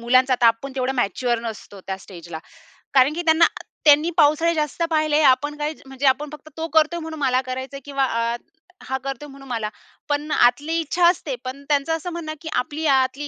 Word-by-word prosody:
मुलांचा 255 +2 +3
आता 240 -1 +3
आपण 230 +4 +1
तेवढा 260 +1 0
मॅच्युअर 245 0 0
नसतो 215 -3 -8
त्या 190 -1 -3
स्टेजला. 170 -4 -9 0.6
कारण 270 +2 +5
की 345 - -3
त्यांना 320 +1 +6 0.4
त्यांनी 300 +3 +6
पावसाळे 315 +2 +4
जास्त 305 +2 -1
पाहिले, 310 -1 +2
आपण 290 +2 +3
काय 300 +1 -2
म्हणजे? 265 +1 -5
आपण 285 +3 +2
फक्त 310 +1 -11
तो 325 +1 -3
करतोय 320 +2 +3
म्हणून 320 -1 -7
मला 260 -2 +2
करायचंय 260 +2 -5
किंवा 275 -1 0 0.3
अ, - - -3 0.5
हा 265 0 -2
करतोय 275 +2 -5
म्हणून 275 0 -13
मला. 225 -3 -2 0.4
पण 295 +1 -1
आतली 285 +7 +3
इच्छा 340 +3 -1
असते. 315 -6 0
पण 270 +2 -6
त्यांचं 295 +2 +1
असं 325 +2 -5
म्हणणं 325 -2 -5
की 320 - -6
आपली 300 +5 -2
आतली 270 +1 +2
280 Hz, 190 wpm, -22 LUFS, 255-310 Hz, 0.6 s, त्यांना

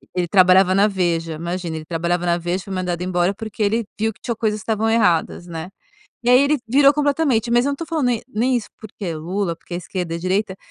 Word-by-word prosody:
Ele 180 -1 0
trabalhava 185 +1 +5
na 200 +2 +4
Veja, 170 -4 -1
imagina, 170 +1 -4
ele 155 0 -6
trabalhava 170 +2 -1
na 170 0 +2
Veja 175 +1 -2
e - - -6
foi 195 - -6
mandado 180 -2 -2
embora 180 +1 +1
porque 220 +1 -7
ele 225 +2 +1
viu 220 +1 0
que - - -28
tinham 235 - -3
coisas 215 -1 -1
que - - -11
estavam 220 0 0
erradas, 190 -6 +1
né? 165 0 -6 0.5
E 240 - -1
aí 250 +1 +7
ele 290 +1 +2
virou 275 +3 +6
completamente. 285 -6 +1
Mas 240 +1 +3
eu 285 - +1
não - - -1
estou 330 +4 -6
falando 315 -5 -1
nem 235 -3 0
nem 250 +2 +1
isso 235 - -4
porque 210 -2 -8
é 165 -2 -3
Lula, 175 +2 -2
porque 175 - -10
é - - -1
esquerda 180 -1 -4
e - - -3
direita, 190 +2 -1
195 Hz, 245 wpm, -21 LUFS, 175-230 Hz, 0.5 s, aí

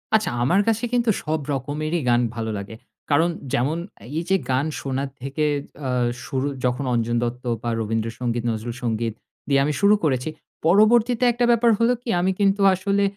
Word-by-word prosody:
আচ্ছা 220 - +2
আমার 180 +10 +3
কাছে 225 +1 +1
কিন্তু 240 -1 +2
সব 155 +1 -1
রকমেরই 150 +5 -2
গান 120 0 +4
ভালো 110 -1 -3
লাগে। 100 +3 -7 0.4
কারণ 165 +4 +4 0.2
যেমন 140 +5 +1 0.4
এই 170 - -3
যে 195 - +4 0.2
গান 130 +3 +1
শোনার 135 0 -3
থেকে 140 +3 -1 0.4
আ - - -1 0.4
শুরু 135 +1 -1 0.2
যখন 125 +2 0
অঞ্জন 120 0 0
দত্ত 125 +1 -3 0.2
বা 120 - -1
রবীন্দ্রসঙ্গীত, 115 +2 -2
নজরুল 115 +1 -3
সঙ্গীত 115 -1 -1 0.3
দিয়ে 140 -1 +3
আমি 150 - 0
শুরু 205 +1 +6
করেছি 130 -1 +1 0.4
পরবর্তীতে 225 +6 +4
একটা 240 +1 +1
ব্যাপার 235 0 +4
হলো 235 +2 +4
কি, 245 - -7
আমি 185 +2 +2
কিন্তু 200 0 +2
আসলে 200 +2 0
145 Hz, 170 wpm, -23 LUFS, 120-200 Hz, 0.4 s, শুরু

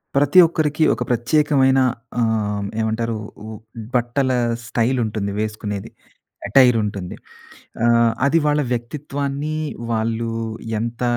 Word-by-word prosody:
ప్రతి 145 +5 +5
ఒక్కరికి 155 -1 0
ఒక - - -7
ప్రత్యేకమైన 135 +2 +3 0.4
ఆహ్, 105 -3 0 0.2
ఏమంటారు 110 +1 -1 0.3
ఓ - - -8 0.5
బట్టల 125 +2 +1 0.4
స్టైల్ 120 +2 0
ఉంటుంది 105 -2 -3
వేసుకునేది, 105 -2 -4 0.6
అటైర్ 125 +2 +5
ఉంటుంది, 100 -3 -5 0.7
ఆహ్, 120 -1 +4
అది 150 +4 +3
వాళ్ళ 150 0 +2
వ్యక్తిత్వాన్ని 140 +4 -3 0.4
వాళ్ళు 115 +1 -1 0.5
ఎంత 115 +2 -4
120 Hz, 100 wpm, -21 LUFS, 110-140 Hz, 0.7 s, ప్రతి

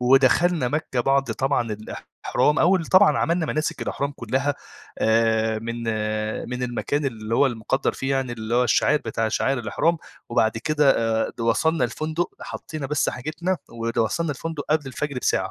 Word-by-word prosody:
ودخلنا 135 +4 +4
مكة 130 -2 -1
بعد 135 +2 +2
طبعًا 135 -5 -1
الإحرام، 110 +7 -1
أول 175 -1 +3
طبعًا 190 +4 +5
عملّنا 170 -1 +1
مناسِك 155 +2 -2
الإحرام 140 +1 -2
كلّها 135 +3 -1 0.4
آآ، 110 0 +2
من 115 +1 -5 0.7
من 125 0 -4
المكان 125 +4 -1
اللي 115 -4 -3
هو 140 - +5
المُقدّر 120 +2 -1
فيه 135 +1 -3
يعني 135 -2 0
اللي 110 0 -4
هو 125 +1 +4
الشع 125 +5 +3
بتاع 115 -4 -2
شعائِرالإحرام، 135 +7 0 0.3
وبعد 115 -2 +1
كده 150 +3 +3 0.4
آآ، - - -8
د - - -6
وصلنا 155 +8 +2
الفندق 155 +3 -2
حَطينا 155 -3 -6
بس 150 +1 0
حاجتنا 155 +8 -2
ود 115 0 -4
وصلنا 155 +8 +1
الفندق 150 +1 -5
قبل 155 -2 +2
الفجر 135 +1 -3
بساعة. - - 0
135 Hz, 155 wpm, -23 LUFS, 115-155 Hz, 0.7 s, طبعًا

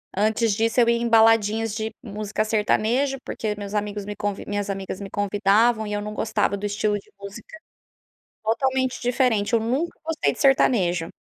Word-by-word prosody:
Antes 220 +2 +1
disso, 225 +3 +1
eu 235 - +4
ia 235 - +3
em 235 0 -1
baladinhas 225 -1 +4
de 220 0 -4
música 215 -1 -3
sertanejo, 225 +5 +1
porque 215 -1 -3
meus 205 0 -7
amigos 210 -1 -2
me 205 - -5
convi 205 -1 -3
minhas 205 0 -3
amigas 195 -1 -4
me 200 -1 -7
convidavam 205 +3 +2
e 210 - -4
eu 205 - -2
não 210 0 -5
gostava 215 -2 0
do 205 - -5
estilo 205 0 0
de - - -21
música 200 +8 -10 0.8
totalmente 260 +3 0
diferente, 245 -4 +1
eu 230 - +5
nunca 260 +10 -2
gostei 315 - 0
de - - -10
sertanejo, 185 -11 +3
215 Hz, 175 wpm, -23 LUFS, 205-230 Hz, 0.8 s, eu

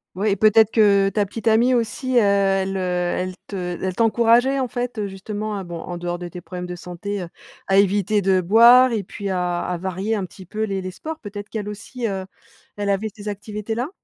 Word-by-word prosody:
Ouais 205 +3 +1
et - - +2
peut-être 220 +1 +5
que, 200 -3 +4
ta 205 0 0
petite 220 +3 -6
amie 230 +3 +4
aussi, 245 +3 -1
heu, - - +8
elle, 195 -1 +2
heu, - - -1
elle 180 0 -1
te 180 -3 -4
elle 190 -1 -2
t'encourageait 235 +4 +3
en 260 - 0
fait, 245 0 -4
heu, 210 -1 -2
justement 205 +2 -5
à 195 - -4
bon 170 -2 -7
en 175 +1 -6
dehors 175 0 -3
de 175 0 -6
tes 175 +1 -9
problèmes 180 0 -7
de 180 0 -6
santé, 180 +3 -5
heu, - - -7 0.4
à 195 - +3
éviter 205 +1 +3
de 190 -1 +3
boire 235 +7 +7
et 215 -3 -1
puis 200 +2 -6
à 180 -2 -1
à 180 - -2
varier 190 +4 -2
un 200 -3 -2
petit 185 +1 -13
peu 215 +4 -3
les - - -1
les 190 - -2
les 185 0 -5
sports. 315 - -7
Peut-être 205 -1 -8
qu'elle 210 -2 -4
aussi, 225 +3 -5
heu, 190 -2 -3 0.5
elle 205 -1 -2
avait 200 +2 0
ces 210 0 -10
activités 210 +1 -4
là? 245 +5 -2
200 Hz, 230 wpm, -22 LUFS, 185-220 Hz, 0.5 s, heu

